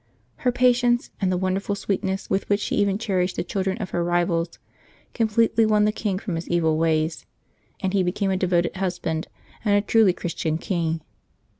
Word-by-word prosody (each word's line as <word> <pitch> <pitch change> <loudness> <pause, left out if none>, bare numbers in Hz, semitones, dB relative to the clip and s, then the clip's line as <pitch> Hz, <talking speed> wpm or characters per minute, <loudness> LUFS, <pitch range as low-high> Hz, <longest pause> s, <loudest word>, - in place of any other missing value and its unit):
Her 250 - +1
patience, 245 -1 +2
and 190 -1 +2
the 180 - +1
wonderful 190 +2 -1
sweet 200 -1 -2
ness 190 +1 -2
with 195 - -1
which 205 0 +3
she - - -2
even 200 -1 +2
cherished 190 -4 -1
the - - -1
children 190 +2 -2
of 205 -6 -5
her 175 - 0
rivals, 170 -1 0 0.6
completely 225 0 +2
won 210 -1 +3
the 210 - +3
king 210 -3 -2
from 195 -2 -4
his 165 +1 -4
evil 160 -2 +2
ways, 160 0 0 0.5
and 190 -1 -1
he 195 - +3
became 195 +2 0
a - - +1
devoted 175 -2 +1
husband 175 -4 -2 0.4
and 205 -2 +3
a 205 - +4
truly 215 -2 +4
Christian 165 -2 -2
king. 165 -2 -2
190 Hz, 185 wpm, -24 LUFS, 175-210 Hz, 0.6 s, a